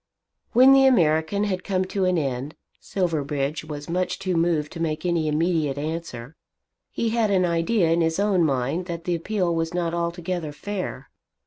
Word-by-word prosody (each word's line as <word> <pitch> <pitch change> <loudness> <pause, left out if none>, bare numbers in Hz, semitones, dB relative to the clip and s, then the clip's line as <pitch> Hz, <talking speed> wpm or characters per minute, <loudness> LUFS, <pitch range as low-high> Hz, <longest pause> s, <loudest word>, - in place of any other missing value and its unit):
When 260 +3 +7
the 270 0 +6
American 165 -3 +2
had 185 -3 -2
come 185 -1 0
to 190 0 -1
an 185 -1 +2
end, 135 -1 -3 0.2
Silverbridge 150 -5 -2
was 150 -2 -7
too - - -7
much 185 +2 -2
moved 165 -3 +1
to 170 - -8
make 155 0 -2
any 170 -3 +1
immediate 155 -2 0
answer. 150 -4 -5 0.5
He 230 - -1
had 225 -1 +1
an 185 -2 +3
idea 170 +1 +1
in 170 +1 +2
his 160 0 +1
own 200 -4 +2
mind 140 +5 -1
that 170 -2 -5
the 175 - -1
appeal 175 +1 -1
was 165 +1 -2
not 170 -1 -1
altogether 170 -1 -3
fair. 185 -6 -5
170 Hz, 175 wpm, -24 LUFS, 155-185 Hz, 0.5 s, When